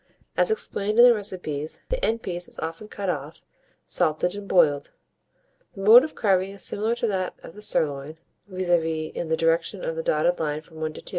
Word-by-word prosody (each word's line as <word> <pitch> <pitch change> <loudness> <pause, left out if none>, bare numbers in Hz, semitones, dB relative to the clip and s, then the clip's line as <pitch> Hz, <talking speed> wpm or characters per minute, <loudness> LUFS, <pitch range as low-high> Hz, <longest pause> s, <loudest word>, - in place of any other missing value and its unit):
As - - +2
explained 215 - -1
in 240 - +9
the 245 - +8
recipes, 180 -8 -4
the - - -2
end 225 +1 0
piece 175 -1 -4
is - - -15
often 165 +6 -5
cut 200 -2 -5
off, 150 -3 -4 0.4
salted 155 +3 0
and 200 0 -7
boiled. 150 -7 +3 0.8
The 195 - -9
mode 225 +6 +9
of 310 - -5
carving 190 -3 +2
is 200 - -4
similar 220 +3 0
to 240 - -2
that 190 -4 -1
of - - -10
the 210 - -12
sirloin, 150 -5 -1 0.3
viz., 185 -2 -4
in 160 -1 0
the 160 - +1
direction 165 +3 0
of 165 - -2
the 165 - -2
dotted 160 +3 +1
line 150 -1 -2
from 160 0 -17
1 155 0 -2
to - - -10
2. - - -8
175 Hz, 205 wpm, -25 LUFS, 160-205 Hz, 0.8 s, in